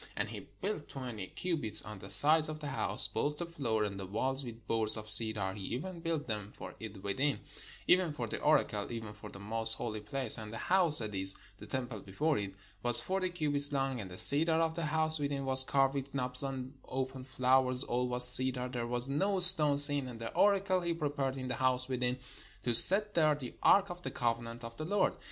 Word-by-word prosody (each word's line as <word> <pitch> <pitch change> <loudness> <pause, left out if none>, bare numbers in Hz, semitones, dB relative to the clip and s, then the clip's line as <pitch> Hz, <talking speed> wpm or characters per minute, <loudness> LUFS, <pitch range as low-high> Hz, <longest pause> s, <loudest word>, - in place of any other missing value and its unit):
And - - -4
he - - -11 0.2
built 190 -7 -6
twenty 120 -8 -9
cubits 150 - -2
on 105 -2 -12
the 100 - -13
sides 155 +1 +3
of 155 0 -9
the 150 -2 -8
house, 135 - -2
both 150 0 -5
the 175 - -6
floor 125 -10 -4
and 100 -2 -7
the 95 - -9
walls 130 +7 -4
with 115 -3 -12
boards 110 -1 -2
of 110 0 -10
cedar: 105 -3 -1
he 100 - -11
even 170 +8 -8
built 165 -2 -5
them 105 -3 -7
for - - -11
it 105 -3 -12
within, 135 +8 -3 0.5
even 180 -2 +1
for 150 - -7
the - - -7
oracle, 120 -9 -2
even 110 -3 -9
for 105 - -14
the - - -13
most 110 +2 -1
holy 110 -3 -7
place. 120 +2 +2
And 105 -1 -10
the 115 - -9
house, 175 -2 +4
that 110 -2 -2
is, 95 0 +4 0.2
the - - -13
temple 125 -4 -6
before 140 +11 -4
it, 100 -1 -8 0.3
was 120 0 +7
forty 185 -1 -4
cubits 145 -4 -1
long. 135 -3 -4
And 95 - -11
the 90 - -12
cedar 160 - +7
of 165 -1 -2
the 165 0 -6
house 155 0 +4
within 140 -1 -5
was 130 0 +6
carved 135 0 -1
with 140 0 -8
knops 125 -1 -2
and 135 -1 -7
open 130 0 -7
flowers: 130 0 +1
all 125 -1 -4
was 125 0 +4
cedar; 125 0 -2
there 120 -2 -6
was 120 +1 -1
no 190 +8 -3
stone 160 -6 +9
seen. 145 -2 +9
And 120 -2 -11
the 115 - -8
oracle 195 -2 0
he 170 -1 -4
prepared 140 -4 -5
in 130 -1 -8
the 125 - -6
house 130 0 -1
within, 125 -1 -4 0.5
to 120 - -2
set 205 - +3
there 155 -2 0
the 130 -4 -10
ark 200 -1 +2
of 175 0 -11
the - - -7
covenant 115 0 -5
of 115 0 -11
the 155 - -7
Lord. 205 +5 -2
130 Hz, 220 wpm, -29 LUFS, 115-150 Hz, 0.5 s, stone